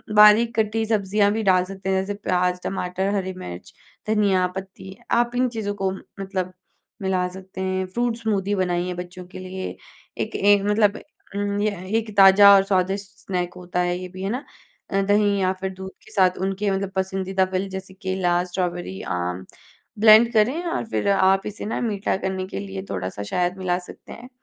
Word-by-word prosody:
बारीक 210 +3 +7
कटी 220 +1 +1
सब्जियाँ 205 -1 +2
भी 220 +1 -1
डाल 185 -2 +4
सकते 195 0 -6
हैं 190 0 +2
जैसे 195 +2 -3
प्याज, 180 -2 0
टमाटर, 190 +1 -2
हरी 190 -1 -2
मिर्च, 90 - -9 0.3
धनिया 200 -4 +2
पत्ती, 190 0 -8
आप 240 +1 +2
इन 255 +1 +2
चीज़ों 220 -3 -3
को 195 -1 -1 0.3
मतलब 190 -2 -3 0.5
मिला 185 -2 0
सकते 190 0 -9
हैं। 185 0 -1
फ्रूट 235 +4 -1
स्मूदी 205 -3 -1
बनाइए 180 -1 0
बच्चों 180 +1 -8
के 185 +1 -10
लिए, 185 0 -6 0.4
एक - - -3
एक 200 0 +4
मतलब 210 0 +3 0.4
उम, 200 0 -1
यह 200 -4 -2
एक 220 -2 -4
ताज़ा 200 +1 +9
और 195 - +5
स्वादिष्ट 195 +1 0
स्नैक 180 -3 -3
होता 180 0 -4
है 175 0 0
ये 185 - -6
भी 185 - -8
है 195 - -1
ना। 250 +6 -3 0.6
दही 205 0 +2
या 185 0 +2
फिर 190 - -1
दूध 190 0 -8
के - - -16
साथ 185 -2 +3
उनके 195 +1 -1
मतलब 195 0 -2
पसंदीदा 190 0 0
फल 190 +1 -1
जैसे 190 0 -7
केला, 185 -2 0
स्ट्रॉबेरी, 175 - -3
आम 90 +1 -3 0.5
ब्लेंड 220 +2 +7
करें 245 +10 +2
और 335 - -2
फिर 205 - 0
आप 195 0 +3
इसे 210 0 -6
ना 215 - -2
मीठा 205 -5 -1
करने 190 -1 -3
के 145 - -5
लिए 95 -1 -6
थोड़ा-सा 95 +1 -4
शहद 180 - -1
मिला 180 -2 0
सकते 180 - -13
हैं, 245 +2 -11
190 Hz, 180 wpm, -23 LUFS, 185-205 Hz, 0.6 s, ताज़ा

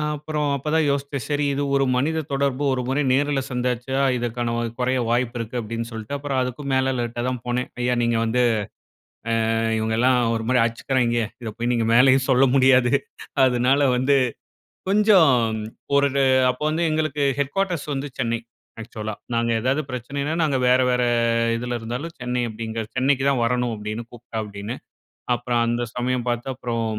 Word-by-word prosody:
அப்பறம் 150 0 -2
அப்ப 140 +3 -6
தான் 160 -1 +3
யோசிச்சேன். 140 -2 -2
சரி 145 0 0
இது 145 - -1
ஒரு 135 0 +3
மனித 160 +5 0
தொடர்பு 140 0 0
ஒரு 125 - -1
முறை 135 +3 +1
நேர்ல 140 +1 +1
சந்திச்சா, 125 +1 -2 0.2
இதற்கான 120 0 -2
வ - - 0 0.2
குறைய 130 +1 +1
வாய்ப்பு 120 0 0
இருக்கு 115 +2 -4
அப்பிடின்னு 115 +1 -4
சொல்லிட்டு, 110 +4 -5
அப்பறம் 140 -2 -2
அதுக்கும் 135 +2 -4
மேல 130 0 +2
லேட்டா 120 0 -3
தான் 125 -2 -3
போனேன். 125 +1 -1
ஐயா! 125 0 +1
நீங்க 115 -1 +1
வந்து, 125 +2 +1 1.1
அ - - +1 0.2
இவுங்கல்லாம் 115 +4 +2 0.2
ஒருமாரி 115 +3 +1
அடிச்சிக்கிறாங்கே, 120 0 0 0.2
இத 110 - -5
போய் 120 +1 -1
நீங்க 115 -1 +1
மேலயும் 130 +1 +5
சொல்ல 130 +1 +5
முடியாது 130 -1 +4 0.5
அதுனால 130 +3 +2
வந்து 130 +3 +2 0.7
கொஞ்சம் 200 -6 +5 0.7
ஒரு 140 0 +4 0.4
அப்ப 125 - -6
வந்து 165 +2 -1
எங்களுக்கு 155 -2 -1 0.2
ஹெட்குவார்டர்ஸ் 170 +3 -1
வந்து 140 +2 -3
சென்னை, 115 -2 0 0.4
ஆக்சுவலா. 110 -1 -6 0.2
நாங்க 115 0 +1
எதாவது 135 +5 0
பிரச்சனைன்னா, 140 +5 -3
நாங்க 145 -4 +1
வேற, 125 +1 +5
வேற 125 0 +1 0.5
இதுல 120 +1 -3
இருந்தாலும் 125 +9 -5
சென்னை 125 0 -1
அப்பிடிங்க 110 +1 -5 0.2
சென்னைக்கு 135 +1 +2
தான் 125 -3 +1
வரணும், 125 0 0
அப்பிடின்னு 105 +2 -5
கூப்பிட்டா 120 -1 -8
அப்பிடின்னு. 105 +3 -6 0.6
அப்பறம் 120 0 0
அந்த 120 +1 0
சமயம் 125 0 -1
பார்த்து 120 +2 -2
அப்புறம் 115 -2 -3
125 Hz, 160 wpm, -23 LUFS, 120-140 Hz, 1.1 s, மேலயும்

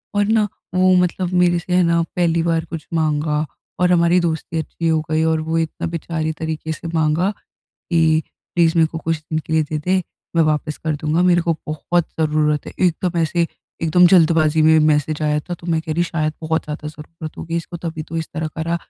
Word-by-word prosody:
और 205 0 +3
ना 215 0 +2 0.3
वो 185 0 +4
मतलब 180 0 +1
मेरे 175 -1 +3
से 180 +1 -4
है 180 0 +4
ना, 170 0 +3
पहली 170 -2 +2
बार 165 -1 0
कुछ 165 -1 -7
माँगा 155 -1 0 0.3
और 180 0 +3
हमारी 170 0 +4
दोस्ती 165 -1 -2
अच्छी 165 +1 -3
हो 160 -1 +3
गई 160 0 +2
और 160 0 +2
वो 160 +1 -1
इतना 165 0 -2
बेचारे 165 -1 -3
तरीके 160 0 -3
से 165 +2 -6
माँगा 160 +4 +2 0.6
कि 160 -2 +3 0.3
प्लीज़ 165 -2 +4
मेरे 160 -1 +5
को 165 - -6
कुछ 165 0 -1
दिन 155 +1 -3
के 160 - -6
लिए 160 0 +3
देदे 155 +5 0 0.3
मैं 165 - +5
वापस 155 0 -1
कर 155 -2 -2
दूँगा। 155 +3 0
मेरे 175 -1 +4
को 170 0 +1
बहुत 160 +2 0
ज़रूरत 150 -1 +1
है। - - -8
एकदम 175 +1 -2
ऐसे 165 +1 +1 0.3
एकदम 165 +2 +5
जल्दबाज़ी 160 -3 +4
में 160 0 +6
मैसेज 150 0 +1
आया 150 0 +1
था। 175 +4 -6
तो 175 0 -10
मैं 165 -2 +1
कह 160 -1 -4
रही 170 +2 +1
शायद 155 -3 -1
बहुत 160 0 -1
ज़्यादा 150 0 -5
ज़रूरत 155 +1 -9
होगी 165 0 -4
इसको 170 +1 -6
तभी 165 -2 -5
तो 165 +2 -6
इस 160 - -3
तरह 155 +1 -2
कर 160 +1 -5
रहा। 170 +1 0
160 Hz, 215 wpm, -20 LUFS, 155-170 Hz, 0.6 s, में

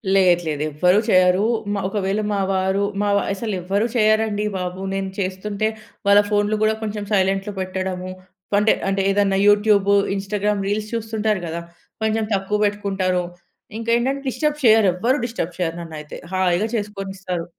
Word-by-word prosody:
లేదు, 180 -3 +4
లేదు 150 -1 -1
ఎవ్వరూ 180 +7 +3
చేయరు. 185 +1 +4 0.3
మా 200 - -1
ఒకవేళ 200 +1 -1
మా 200 - 0
వారు 190 +1 +1 0.2
మావా 200 -1 +2
అసలెవ్వరూ 200 0 -1
చేయరండీ 215 -1 +2
బాబు. 180 0 -4
నేను 195 0 -2
చేస్తుంటే 200 +3 -2 0.4
వాళ్ళ 200 0 +7
ఫోన్లు 205 0 +1
గూడా 215 0 +3
కొంచెం 210 -1 -3
సైలెంట్‌లో 195 +1 +1
పెట్టడము 185 0 -3 0.5
అంటే, 210 +1 +4 0.2
అంటే 195 0 0
ఏదన్నా 195 -1 +2
యూట్యూబు 205 -1 +4 0.2
ఇన్‌స్టా‌గ్రామ్ 200 +1 -1
రీల్స్ 210 +1 -2
చూస్తుంటారు 220 -2 -1
గదా! 170 +1 -4 0.4
కొంచెం 220 0 +1
తక్కువ 195 +1 0
పెట్టుకుంటారు. 195 -3 0 0.5
ఇంకేంటంటే 235 +4 0
డిస్టర్బ్ 300 +3 -1
చేయ్యరెవ్వరూ 220 +2 +4
డిస్టర్బ్ 180 -8 -4
చేయరు 165 -2 -1
నన్నైతే 155 -3 -8 0.2
హాయిగా 185 +1 +2
చేసుకొనిస్తారు. 195 -4 -4
200 Hz, 135 wpm, -21 LUFS, 185-215 Hz, 0.5 s, వాళ్ళ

